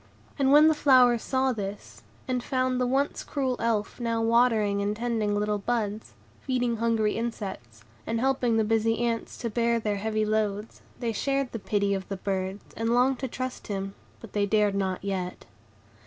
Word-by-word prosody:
And 270 -1 +3
when 300 +2 +8
the 315 - +5
flowers 255 -5 +5
saw 265 0 +1
this, 200 -2 -7 0.3
and 250 -2 -1
found 255 -1 0
the 250 - +2
once 270 +3 0
cruel 265 -3 -1
Elf 225 -1 -1
now 230 -1 -1
watering 225 -3 +3
and 205 +1 -1
tending 220 -3 -1
little 210 0 0
buds, 215 -1 -2 0.3
feeding 245 -3 0
hungry 225 -2 +1
insects, 190 - -5 0.2
and 225 0 -1
helping 250 -3 +1
the 220 - +3
busy 225 +1 +1
ants 230 -1 -3
to 235 - -3
bear 235 +1 +1
their 210 -2 -1
heavy 215 +1 -1
loads, 215 0 -1 0.2
they 235 -2 -1
shared 275 +3 -1
the 230 - -4
pity 200 -1 0
of 190 -1 -4
the 195 - -3
birds, 190 +1 -3
and 225 0 -1
longed 255 +1 +3
to 265 - -2
trust 255 +1 -5
him; 195 -1 -3 0.3
but 225 - -12
they 205 -1 +1
dared 210 -1 +2
not 190 -2 -2
yet. 185 -2 -4
225 Hz, 180 wpm, -27 LUFS, 205-245 Hz, 0.3 s, when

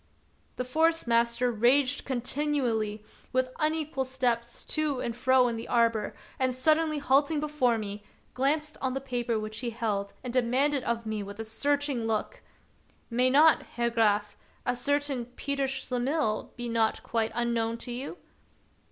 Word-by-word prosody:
The 250 - -3
Forest 325 +5 +2
master 235 +1 +2
raged 255 +5 +3
continually 245 -5 -1 0.3
with 255 0 0
un 310 +1 +2
equal 305 -4 -2
steps 245 -3 -1
to 305 -4 -1
and 235 -2 -3
fro 255 +1 +4
in 235 -1 -2
the 225 - -6
arbor, 230 -3 +1 0.2
and, 255 -1 +1
suddenly 310 +3 +2
halting 285 +2 +2
before 290 -6 +1
me, 205 -1 -5 0.3
glanced 300 +4 0
on 260 -1 -1
the - - 0
paper 245 -4 -2
which 215 0 -5
he 245 - -2
held 210 -3 -2
and 250 -2 -5
demanded 260 +3 +2
of 230 0 -1
me 215 -1 -2
with 200 +1 -8
a 225 - -3
searching 280 +1 0
look: 225 - -2 0.2
— - - -36
" - - -37
May 250 +2 +3
not, 300 +4 +6
Herr 235 0 -2
Graf, 210 -3 +2 0.3
a - - +1
certain 280 -1 0
Peter 280 -1 -1
Schle 265 -2 -3
mihl 275 -4 0
be 240 -1 -5
not 230 -1 +1
quite 225 -1 -1
unknown 230 -1 0
to 245 - -7
you 260 +8 -5
250 Hz, 165 wpm, -28 LUFS, 230-280 Hz, 0.3 s, not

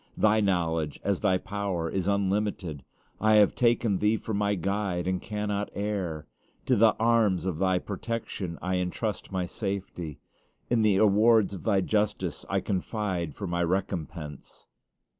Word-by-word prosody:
Thy 110 0 +4
knowledge, 85 -6 0
as 100 -2 0
Thy 95 -3 +2
power, 95 -3 -3
is 95 +2 -2
unlimited. 100 -6 -1 0.4
I 110 +1 +4
have 105 -2 +6
taken 115 -4 +2
Thee 105 +2 +2
for 110 - -5
my 100 0 +1
guide, 95 -1 -1
and 95 0 -1
cannot 105 -1 -2
err. 95 -7 -2 0.4
To 130 - +3
the 110 0 +5
arms 110 -5 +2
of 90 -4 -2
Thy 95 -1 +2
protection 100 -3 -4
I 90 +1 0
intrust 95 +5 -3
my 95 -1 -1
safety. 90 -5 -5 0.5
In 120 -2 +3
the 105 -3 +4
awards 110 0 +4
of 95 - -8
Thy 100 -3 +3
justice 105 -4 -1
I - - +1
confide 95 - -2
for 100 - -5
my 85 -1 0
recompense. 85 -4 -4
100 Hz, 150 wpm, -28 LUFS, 90-105 Hz, 0.5 s, have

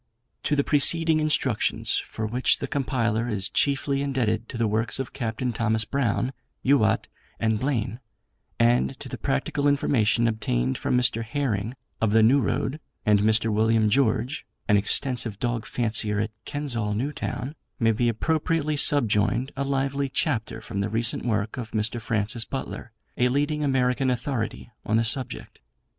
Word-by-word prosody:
To 150 - +2
the 140 - +2
preceding 160 +3 +4
instructions, 155 -1 +2
for 110 - -5
which 120 +4 +1
the - - -4
compiler 120 -6 -1
is 100 -4 -1
chiefly 140 0 +1
indebted 120 -5 -1
to - - -5
the 115 - +1
works 110 0 0
of 135 - -5
Capt. 115 -1 -4
Thomas 110 -1 +1
Brown, 125 0 -1 0.3
Youatt, 110 -5 +3 0.3
and 110 -1 +1
Blaine, 120 -4 -2 0.6
and 115 - +2
to - - -8
the - - -7
practical 140 - -1
information 120 -5 +2
obtained 65 - -1
from 125 - +1
Mr. 120 -2 +2
Herring 115 -3 -2 0.3
of 110 -2 +2
the 110 0 +5
New 135 +5 +5
Road, 140 +3 -1 0.3
and 105 -2 +4
Mr. 110 +1 +2
William 110 0 +2
George, 125 +2 +1 0.2
an 105 - +4
extensive 115 +1 +1
dog 120 -1 -2
fancier 110 -3 0
at 110 +1 -1
Kensall 120 -8 -2
New 130 +7 -1
Town, 135 0 -4 0.3
may 115 -2 +3
be 120 +2 +1
appropriately 155 +4 0
subjoined 120 -1 +3
a 140 - -1
lively 140 0 -1
chapter 115 -6 -1
from 100 -2 -4
the 100 - -1
recent 115 +2 -1
work 110 0 -1
of 115 -3 -6
Mr. 110 +2 -1
Francis 110 +1 -1
Butler, 130 -2 -6 0.3
a 125 - +3
leading 145 +3 0
American 130 -1 +1
authority 120 -2 -3
on 110 - +1
the 115 - +2
subject. 125 +2 -3
120 Hz, 155 wpm, -25 LUFS, 110-135 Hz, 0.6 s, the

